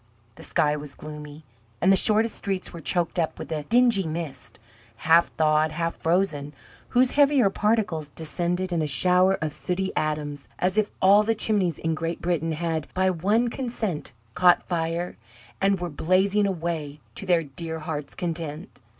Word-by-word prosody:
The - - -15
sky 150 -1 +1
was 150 -1 -8
gloomy, 150 0 -10 0.4
and 185 - +4
the - - +6
shortest 215 +3 +5
streets 190 -2 -3
were 170 - -7
choked 175 0 -1
up 160 - -1
with - - -8
a 150 -2 -3
dingy 235 -5 +3
mist, 140 -8 -6 0.4
half 165 +7 +4
thawed, 155 0 +2
half 165 +2 -2
frozen, 160 -5 -1 0.3
whose 250 +1 +3
heavier 280 -7 +4
particles 205 -9 0
descended 175 +4 -1
in 165 - 0
a 155 - -1
shower 180 +6 +3
of 155 -2 -2
sooty 190 +3 -2
atoms, 150 -2 -3
as 185 +2 0
if 215 -1 +1
all 200 +2 +7
the 225 +1 0
chimneys 200 -7 0
in 165 0 -2
Great 165 +1 -3
Britain 165 -2 -1
had, 160 -1 -3
by 185 0 +2
one 205 +8 +1
consent, 230 - -3 0.2
caught 180 +4 +4
fire, 170 0 -2 0.4
and 195 -1 +2
were 175 - -3
blazing 190 +6 +2
away 165 -5 -4
to 195 - -8
their 175 -2 +3
dear 160 +3 -6
heart's 155 -2 -6
content. 165 -2 -5
170 Hz, 165 wpm, -25 LUFS, 155-195 Hz, 0.4 s, all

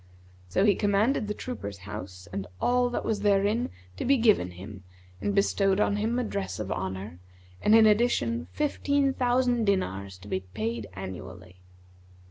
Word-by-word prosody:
So 190 - +2
he 205 - +6
commanded 210 +4 +1
the 210 - -3
trooper's 105 - -6
house 95 -3 -8
and 95 -1 -3
all 245 0 +2
that 245 - -3
was 215 -2 0
therein 205 +3 +2 0.3
to - - -3
be 275 +2 +4
given 215 - +3
him 95 +2 -10 0.4
and 205 - -1
bestowed 195 -1 +2
on 205 -1 +2
him 225 +3 0
a 250 - +1
dress 200 -3 -3
of 105 -2 -4
honour 95 0 -4 0.4
and 215 - +5
in 225 -1 +8
addition 205 - +2
fifteen 285 -2 +1
thousand 245 -2 +2
dinars 100 - -1
to 95 +3 -14
be 95 - -1
paid 110 +4 -4
annually. 90 -1 -9
195 Hz, 160 wpm, -28 LUFS, -, 0.4 s, in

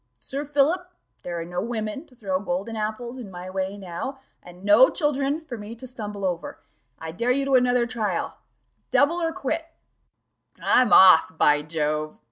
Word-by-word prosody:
Sir 280 +2 -5
Philip, 305 +6 +1 0.3
there 175 -1 -4
are 165 - -5
no 175 +1 -3
women 225 - -4
to 255 - -21
throw 195 -6 -2
golden 195 +4 -3
apples 225 +4 -4
in 225 -5 -8
my 180 0 -8
way 190 +1 -3
now, 195 +9 -6 0.2
and 180 +1 -14
no 210 +6 +7
children 290 +1 -1
for 245 -6 -6
me 210 +2 -8
to 235 - -10
stumble 210 -5 -6
over: 175 -2 -3 0.4
I 160 0 -7
dare 235 +9 -2
you 270 +2 +2
to 275 - -1
another 250 -1 +4
trial 220 -7 -2 0.5
double 335 +5 +3
or 330 -1 0
quit." 325 +2 -3 1.0
"I'm 250 0 +3
off, 175 -3 +7
by 150 -1 +4
Jove!" 155 0 -2
220 Hz, 170 wpm, -24 LUFS, 180-265 Hz, 1.0 s, no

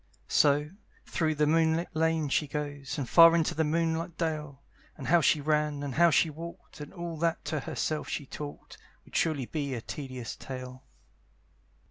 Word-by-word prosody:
So, 150 +1 +3 0.3
through 155 -3 0
the 150 0 +2
moonlight 160 +1 +1
lane 160 -1 +1
she 145 +2 +1
goes, 145 -2 -4
And 140 -4 -3
far 165 +3 +8
into 165 -2 +1
the 160 - +1
moonlight 165 +1 -1
dale; 150 -4 -3 0.3
And 140 - -7
how 170 +1 +5
she 150 - +3
ran, 150 -1 0
and 140 -2 -4
how 170 +4 +5
she 160 +1 +3
walked, 165 0 -10
And 145 - -8
all 170 -3 -6
that 165 +1 -1
to 155 - -1
herself 155 +1 -3
she 145 - -3
talked, 145 +2 -9 0.3
Would - - -15
surely 150 -6 +1
be 140 -1 -3
a 115 - -5
tedious 130 -3 -6
tale. 130 0 -8
150 Hz, 170 wpm, -29 LUFS, 140-165 Hz, 0.3 s, far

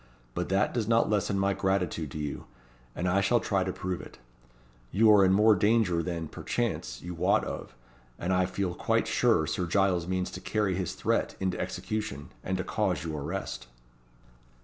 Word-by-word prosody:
But - - -3
that 95 +2 +2
does 115 -4 -1
not 115 -1 +3
lessen 100 -1 +1
my 100 0 +2
gratitude 95 -5 -1
to 70 - -7
you; 75 -2 -4 0.5
and 90 - -1
I 95 +2 +3
shall 120 +5 +3
try 100 -3 0
to 95 - -2
prove 90 -1 -4
it. - - -12 0.7
You 110 +3 +5
are 100 -2 +7
in 95 - +4
more 105 +3 +6
danger 100 -3 +2
than, 85 -2 -3
perchance, - - -3
you 90 - -5
wot 85 - +2
of; - - -6 0.4
and 90 +2 -1
I 90 0 +2
feel 95 -1 -2
quite - - +1
sure 80 - +3
Sir 80 +4 -2
Giles 90 -2 +2
means 95 0 -1
to - - -7
carry 105 -3 0
his 90 -1 -3
threat - - 0
into 95 -1 -1
execution, 105 -10 -4
and 95 0 -1
to 90 - -2
cause - - -1
your 80 -3 -4
arrest." 70 - -4
95 Hz, 185 wpm, -29 LUFS, 90-100 Hz, 0.7 s, are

